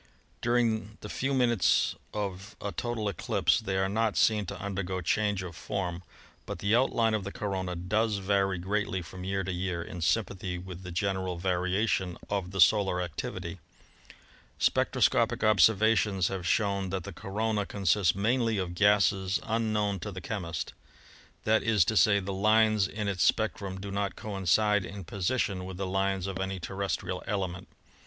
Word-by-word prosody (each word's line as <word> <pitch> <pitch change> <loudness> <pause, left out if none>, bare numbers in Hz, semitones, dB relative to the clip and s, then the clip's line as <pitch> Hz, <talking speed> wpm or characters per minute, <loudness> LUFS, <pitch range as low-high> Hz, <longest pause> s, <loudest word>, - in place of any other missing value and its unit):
During 115 -3 +1
the 105 - -7
few 135 +5 -2
minutes 120 -7 +3 0.2
of 100 0 -5
a 100 - -4
total 120 -2 -3
eclipse 100 +3 +1
they 100 -4 -2
are 95 0 +2
not 110 +2 0
seen 105 -3 +3
to - - -6
undergo 95 -1 -3
change 100 +2 0
of 85 -3 -7
form, 90 -3 -3 0.5
but - - -4
the 100 +3 +2
outline 115 -3 +2
of 110 -2 0
the 100 - -5
corona 95 -4 -3
does 105 +5 0
vary 95 -1 +1
greatly 95 0 -1
from 90 +2 -9
year 95 +1 -1
to 95 - -3
year, 90 -1 -2
in 90 0 -8
sympathy 95 -1 0
with 90 0 -8
the 90 - -8
general 95 -1 -1
variation 90 +1 0
of 95 -3 -1
the 95 +1 -5
solar 95 +2 +4
activity. 85 -4 -5 1.0
"Spectroscopic 115 0 +2
observations 105 -2 +4
have 95 -3 -4
shown 100 -1 +1
that 95 -1 -3
the 100 - -7
corona 105 +3 -2
consists 95 -2 +2
mainly 115 +2 +1
of 90 -2 -2
gases 100 -1 +3
unknown 105 -3 0
to 105 +5 -5
the 95 - -6
chemist. 90 -4 -4 0.7
That 110 +1 +3
is 105 -6 +3
to 110 - 0
say, 100 -1 +5
the 100 0 -4
lines 110 0 +3
in 105 +1 -4
its 95 -3 -1
spectrum 100 -4 +1
do 100 +1 -6
not 100 -2 -2
coincide 105 +1 +1
in 100 +1 -7
position 95 +1 -1
with 95 0 -7
the 95 - -2
lines 95 0 0
of 95 -1 -4
any 95 0 -2
terrestrial 95 0 -3
element. 95 -3 -3
100 Hz, 160 wpm, -29 LUFS, 95-105 Hz, 1.0 s, say